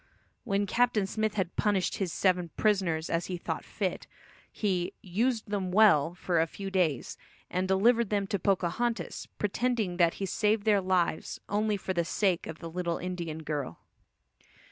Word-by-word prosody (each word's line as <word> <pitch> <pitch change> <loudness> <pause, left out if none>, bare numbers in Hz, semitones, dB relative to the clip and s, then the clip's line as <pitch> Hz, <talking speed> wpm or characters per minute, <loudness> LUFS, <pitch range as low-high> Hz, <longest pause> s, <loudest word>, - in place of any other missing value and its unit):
When 200 +1 +1
Captain 230 -1 +2
Smith 215 +2 -1
had 185 -4 -2
punished 200 -3 +1
his 190 -4 -2
seven 180 -2 +1
prisoners 185 -7 +1
as 165 +1 -1
he 180 - -3
thought - - -4
fit, - - -3 0.4
he 185 -4 -1
"used 220 +4 -1
them 190 -3 -1
well" 180 -6 +5
for 175 -2 +1
a 165 - +1
few 195 +3 -7
days, 170 -9 0 0.3
and 185 +1 0
delivered 225 +4 +3
them 205 -1 +1
to 200 0 -2
Pocahontas, 195 +6 -1
pretending 215 -3 0
that 170 -2 +3
he 195 - -3
saved 210 +2 +1
their 205 -2 +4
lives 180 -4 0
only 210 0 +1
for 190 -1 -3
the 170 -1 +1
sake 180 +1 0
of 160 - -6
the 165 -1 -8
little 170 -1 -2
Indian 170 -3 -5
girl. 145 - -4
190 Hz, 165 wpm, -29 LUFS, 175-210 Hz, 0.4 s, well